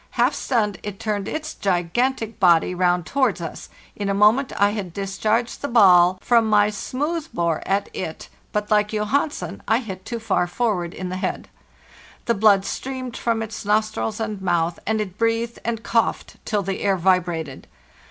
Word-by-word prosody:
Half 245 Hz, +4 st, +3 dB
stunned, 220 Hz, -8 st, -1 dB
it 205 Hz, -2 st, -7 dB
turned 205 Hz, -2 st, -2 dB
its 310 Hz, 0 st, -4 dB
gigantic 220 Hz, +6 st, -1 dB
body 175 Hz, -2 st, +4 dB
round 180 Hz, -1 st, +1 dB
towards 260 Hz, -4 st, +1 dB
us; 165 Hz, -2 st, -7 dB, 0.3 s
in 205 Hz, -1 st, -3 dB
a 195 Hz, -, +1 dB
moment 220 Hz, +7 st, +4 dB
I 200 Hz, 0 st, +4 dB
had 200 Hz, -5 st, -5 dB
discharged 215 Hz, +5 st, -1 dB
the 285 Hz, -, -2 dB
ball 185 Hz, -7 st, +6 dB
from 230 Hz, -2 st, +3 dB
my 210 Hz, 0 st, +4 dB
smooth 295 Hz, +10 st, -3 dB
bore 170 Hz, -2 st, 0 dB
at 200 Hz, +1 st, +1 dB
it, 160 Hz, -4 st, -5 dB, 0.2 s
but, 210 Hz, 0 st, -2 dB
like 210 Hz, 0 st, +2 dB
Johansen, 210 Hz, -, -1 dB
I 225 Hz, -, +4 dB
hit 195 Hz, -7 st, -6 dB
too 235 Hz, -, -4 dB
far 215 Hz, -5 st, 0 dB
forward 180 Hz, -4 st, -1 dB
in 185 Hz, -1 st, -5 dB
the 185 Hz, -, -4 dB
head. 185 Hz, -, -3 dB, 0.8 s
The 235 Hz, -, +2 dB
blood 200 Hz, -2 st, +4 dB
streamed 255 Hz, +1 st, -5 dB
from 230 Hz, -1 st, -1 dB
its 225 Hz, +1 st, -7 dB
nostrils 215 Hz, +1 st, 0 dB
and 215 Hz, -3 st, -3 dB
mouth, 170 Hz, -2 st, 0 dB
and 220 Hz, 0 st, +1 dB
it 205 Hz, -2 st, -5 dB
breathed 230 Hz, 0 st, 0 dB
and 225 Hz, -1 st, -3 dB
coughed 230 Hz, -1 st, 0 dB
till 210 Hz, -2 st, 0 dB
the 195 Hz, +1 st, -3 dB
air 195 Hz, -2 st, +2 dB
vibrated. 170 Hz, -5 st, 0 dB
210 Hz, 170 wpm, -22 LUFS, 185-230 Hz, 0.8 s, ball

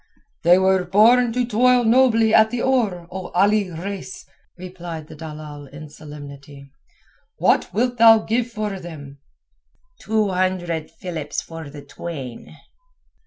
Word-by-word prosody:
"They 175 Hz, +2 st, +5 dB
were 190 Hz, 0 st, +2 dB
born 230 Hz, +6 st, +4 dB
to 250 Hz, 0 st, 0 dB
toil 245 Hz, +2 st, +3 dB
nobly 225 Hz, -2 st, +3 dB
at 220 Hz, 0 st, +6 dB
the 240 Hz, 0 st, -3 dB
oar, 215 Hz, -10 st, 0 dB
O 185 Hz, 0 st, -6 dB
Ali 200 Hz, +1 st, +3 dB
Reis," 190 Hz, +3 st, -7 dB, 0.3 s
replied 175 Hz, -3 st, -8 dB
the 155 Hz, -, -12 dB
dalal 150 Hz, -2 st, -9 dB
in 145 Hz, +3 st, -11 dB
all 155 Hz, -, -11 dB
solemnity. 145 Hz, -2 st, -12 dB, 0.7 s
"What -, -, +2 dB
wilt 245 Hz, +2 st, -1 dB
thou 225 Hz, -1 st, +8 dB
give 230 Hz, +2 st, -1 dB
for 210 Hz, -4 st, -4 dB
them?" 145 Hz, -5 st, -10 dB, 0.8 s
"Two 215 Hz, -1 st, 0 dB
hundred 180 Hz, -4 st, -2 dB
philips 165 Hz, -3 st, -5 dB
for 165 Hz, -2 st, -9 dB
the 145 Hz, 0 st, -11 dB
twain." 135 Hz, -8 st, -8 dB
185 Hz, 135 wpm, -21 LUFS, 155-220 Hz, 0.8 s, thou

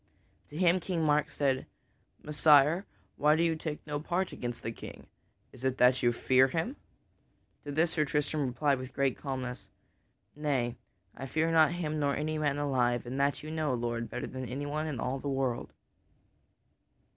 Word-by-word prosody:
To 150 Hz, -, -8 dB
him 180 Hz, +1 st, +4 dB
King 175 Hz, -2 st, -2 dB
Mark 150 Hz, -1 st, +2 dB
said: 135 Hz, -2 st, 0 dB, 0.6 s
"Messire, 150 Hz, +3 st, +4 dB, 0.3 s
why 150 Hz, +2 st, +4 dB
do 165 Hz, -, +2 dB
you 165 Hz, -1 st, +2 dB
take 155 Hz, -1 st, -5 dB
no 145 Hz, -1 st, -3 dB
part 175 Hz, +5 st, -1 dB
against 120 Hz, -1 st, -5 dB
this 115 Hz, 0 st, -6 dB
knight? -, -, -9 dB, 0.5 s
Is 125 Hz, -, -14 dB
it 130 Hz, -1 st, 0 dB
that 125 Hz, +1 st, +5 dB
you 120 Hz, -, +4 dB
fear 130 Hz, +2 st, +4 dB
him?" 165 Hz, -, -2 dB, 0.9 s
To 145 Hz, -, -4 dB
this 160 Hz, +3 st, +2 dB
Sir 155 Hz, -2 st, +1 dB
Tristram 150 Hz, 0 st, 0 dB
replied 140 Hz, +2 st, +1 dB
with 130 Hz, 0 st, -8 dB
great 135 Hz, -2 st, +1 dB
calmness: 130 Hz, -3 st, -5 dB, 0.7 s
"Nay, 135 Hz, -5 st, -1 dB, 0.4 s
I 135 Hz, -, -6 dB
fear 160 Hz, +3 st, +1 dB
not 160 Hz, 0 st, +5 dB
him 155 Hz, -3 st, -2 dB
nor 140 Hz, -1 st, +1 dB
any 155 Hz, +1 st, -2 dB
man 145 Hz, -2 st, +1 dB
alive, 125 Hz, -4 st, +1 dB
and 130 Hz, +3 st, -4 dB
that 140 Hz, +1 st, +1 dB
you 155 Hz, -, -6 dB
know, 155 Hz, -4 st, 0 dB
Lord, 120 Hz, -1 st, -3 dB
better -, -, -4 dB
than 130 Hz, -1 st, -6 dB
anyone 145 Hz, +4 st, -3 dB
in 140 Hz, -6 st, -4 dB
all 130 Hz, +3 st, -1 dB
of -, -, -10 dB
the 145 Hz, -, -3 dB
world." 135 Hz, -3 st, -1 dB
145 Hz, 180 wpm, -30 LUFS, 130-155 Hz, 0.9 s, that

